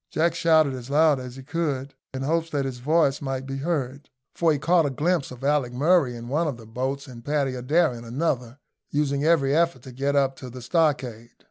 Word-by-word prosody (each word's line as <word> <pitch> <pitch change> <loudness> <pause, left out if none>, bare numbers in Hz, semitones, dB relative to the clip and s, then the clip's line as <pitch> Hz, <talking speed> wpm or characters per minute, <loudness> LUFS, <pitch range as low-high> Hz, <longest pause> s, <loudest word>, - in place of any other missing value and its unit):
Jack 165 +1 +1
shouted 160 -4 +3
as 125 0 -7
loud 150 -1 +4
as 125 -1 -8
he 135 - -10
could, 140 -3 -2 0.2
in 130 0 -4
hopes 165 +3 0
that 145 -3 -1
his 130 -2 -5
voice 145 +1 +2
might 135 -1 -3
be 135 0 -4
heard, 140 -2 -3 0.2
for 165 -1 +2
he 150 - +1
caught 170 +4 +3
a - - -1
glimpse 155 +3 0
of 125 +1 -11
Alick 140 -3 +1
Murray 145 -1 +3
in 120 0 -8
one 155 +6 0
of 140 -5 -3
the 115 - -13
boats 130 +5 -3
and 120 -4 -11
Paddy 145 -2 0
Adair 140 +4 +2
in 120 -1 -9
another, 125 -1 -2 0.3
using 145 -1 0
every 150 -4 +3
effort 165 -6 +1
to 130 - -10
get 140 +3 -1
up 135 -1 +2
to 130 - -8
the 125 0 -9
stockade. 130 -6 0
140 Hz, 220 wpm, -25 LUFS, 130-155 Hz, 0.3 s, loud